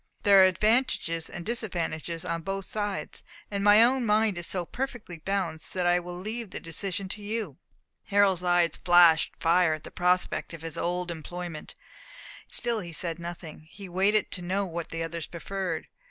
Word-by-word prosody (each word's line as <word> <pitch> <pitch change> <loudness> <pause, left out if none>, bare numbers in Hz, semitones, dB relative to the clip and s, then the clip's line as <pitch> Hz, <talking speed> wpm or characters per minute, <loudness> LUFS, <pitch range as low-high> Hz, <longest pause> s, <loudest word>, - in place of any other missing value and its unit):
There 200 -2 +7
are - - +9
advantages 185 -4 +1
and 175 - -7
disadvantages 170 -7 -3
on 165 0 -2
both 195 +2 -4
sides; 205 -2 -3 0.3
and 200 -1 -1
my 210 +2 +8
own 255 +2 +3
mind 215 -2 +3
is 175 - -3
so 180 -2 -1
perfectly 240 -7 -5
balanced 185 -3 -3
that 180 -1 0
I 175 0 +4
will 175 0 -7
leave 220 +4 -5
the - - -6
decision 190 +4 -2
to 210 - -5
you." 205 - -4 0.5
Harold's 195 -2 +3
eyes 175 -1 +3
flashed 175 -3 +6
fire 170 -1 +3
at 155 - -12
the - - -10
prospect 180 -1 0
of 165 - -12
his 165 -2 -6
old 180 0 -2
employment; 170 0 -7 0.7
still 235 -2 -1
he 175 -4 -7
said 165 +1 -4
nothing; 170 -2 -8
he 195 +2 -10
waited 195 +4 +2
to 180 - -3
know 190 +3 -1
what 170 -2 -5
the 165 0 -3
others 165 -1 -4
preferred. 180 -1 -4
180 Hz, 175 wpm, -28 LUFS, 170-205 Hz, 0.7 s, are